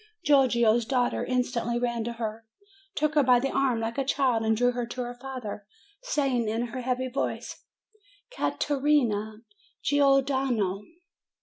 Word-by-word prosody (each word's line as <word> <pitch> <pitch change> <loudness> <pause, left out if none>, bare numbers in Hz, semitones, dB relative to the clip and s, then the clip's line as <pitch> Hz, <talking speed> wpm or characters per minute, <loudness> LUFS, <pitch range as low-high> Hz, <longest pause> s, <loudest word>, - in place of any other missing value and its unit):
Giorgio's 240 -5 +4
daughter 245 +1 0
instantly 245 -2 -1
ran 235 -1 -1
to 235 - -3
her, 225 -1 -5 0.5
took 305 0 0
her 300 - +4
by 250 -2 +5
the 270 +2 -1
arm, 260 -4 +1
like 225 +3 -3
a - - +2
child, 260 -4 +1
and 220 0 +1
drew 245 +1 +3
her 245 -1 -3
to 250 +2 -5
her 245 0 -5
father, 245 -5 -7 0.3
saying, 275 - 0
in 230 +2 -2
her 255 - -3
heavy 255 +1 -1
voice, 260 +2 -4 0.7
"Ca - - -1
te 295 - -1
rina 230 -7 +1 0.4
Gior 275 -2 +4
dano." 240 -9 0
245 Hz, 160 wpm, -27 LUFS, 230-270 Hz, 0.7 s, by